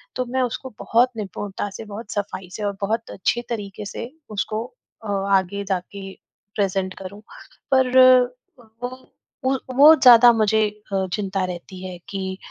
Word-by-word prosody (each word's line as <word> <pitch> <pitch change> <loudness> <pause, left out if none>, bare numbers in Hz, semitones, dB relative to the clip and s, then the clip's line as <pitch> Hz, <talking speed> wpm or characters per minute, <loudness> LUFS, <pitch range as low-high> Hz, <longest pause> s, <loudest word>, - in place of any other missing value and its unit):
तो 255 - -1
मैं 260 +2 -1
उसको 255 0 -3
बहुत 245 +2 +2
निपुणता 200 0 -5
से, 220 +3 -9
बहुत 210 +1 -8
सफ़ाई 190 -3 -4
से 215 - -5
और 200 -1 -1
बहुत 225 +3 -2
अच्छे 240 +6 -1
तरीके 205 -2 -5
से 235 +5 -7 0.2
उसको 215 +2 -3 0.4
अ, - - -5 0.3
आगे 200 +2 -3
जाके 195 +1 -4 0.4
प्रेज़ेंट 190 -2 -1
करूँ। 200 +2 -9 0.5
पर 260 -1 +4 0.9
वो 245 - -1 0.5
उ 265 +1 +1 0.2
वो 295 +4 +9
ज़्यादा 245 -4 +8
मुझे 220 -1 +2 0.3
अ, 190 -1 0
चिंता 195 -2 -2
रहती 185 +1 -8
है 180 -1 -8
कि 190 -1 -4
205 Hz, 150 wpm, -22 LUFS, 190-235 Hz, 0.9 s, वो